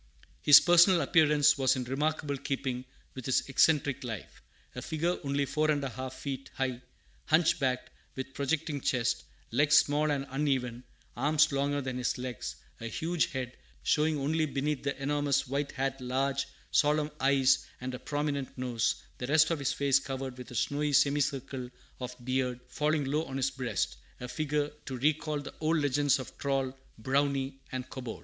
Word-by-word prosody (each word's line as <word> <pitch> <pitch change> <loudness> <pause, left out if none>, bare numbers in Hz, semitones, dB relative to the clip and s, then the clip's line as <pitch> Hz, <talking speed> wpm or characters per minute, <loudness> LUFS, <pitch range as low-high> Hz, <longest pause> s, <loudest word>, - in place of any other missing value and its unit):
His 145 - +10
personal 175 +1 +6
appearance 150 -1 +4
was 130 -2 +3
in 130 - -2
remarkable 145 +3 -1
keeping 130 -2 -3 0.3
with 130 -3 -7
his 130 - +1
eccentric 140 -1 +2
life. 115 -5 -7 0.3
A - - -6
figure 165 +3 -1
only 140 0 0
four 155 +3 0
and 145 -2 +1
a 135 - -2
half 130 +1 -6
feet 135 -1 -5
high, 130 -2 -2 0.4
hunchbacked, 155 -5 +2 0.2
with 130 0 -6
projecting 145 +1 -1
chest, 125 -3 0 0.3
legs 150 +1 +5
small 150 +1 +3
and 140 -2 0
uneven, 130 -4 -1 0.3
arms 150 +4 +3
longer 140 +1 0
than 130 -1 -4
his 125 - -1
legs; 125 -2 -5 0.2
a 115 - -5
huge 160 +8 0
head, 130 -5 -5 0.3
showing 155 - +2
only 155 +3 0
beneath 145 0 -1
the 140 0 -3
enormous 140 0 +1
white 140 +2 -2
hat 135 -1 -2
large, 135 +2 -1 0.2
solemn 150 0 +2
eyes 135 -1 +3
and 125 0 -5
a 125 - -5
prominent 145 -3 -3
nose; 120 -3 0 0.2
the 125 - -3
rest 155 +3 +4
of 165 - 0
his 140 - 0
face 140 -1 +3
covered 135 -1 -5
with 125 -1 -10
a 125 - -9
snowy 145 +5 0
semicircle 140 -3 +1 0.3
of 125 0 -5
beard 130 -1 0
falling 150 -1 0
low 150 +4 0
on 135 - -5
his 135 0 +1
breast, 130 -2 -2 0.2
a 125 - -6
figure 150 +2 -1 0.2
to 130 -2 -4
recall 150 +2 0
the 145 - -8
old 160 +1 +2
legends 145 -1 +2
of 130 - -8
troll, 135 -2 -1 0.2
brownie, 135 +2 0
and 130 0 -4
kobold. 125 -4 -6
140 Hz, 170 wpm, -30 LUFS, 130-150 Hz, 0.4 s, His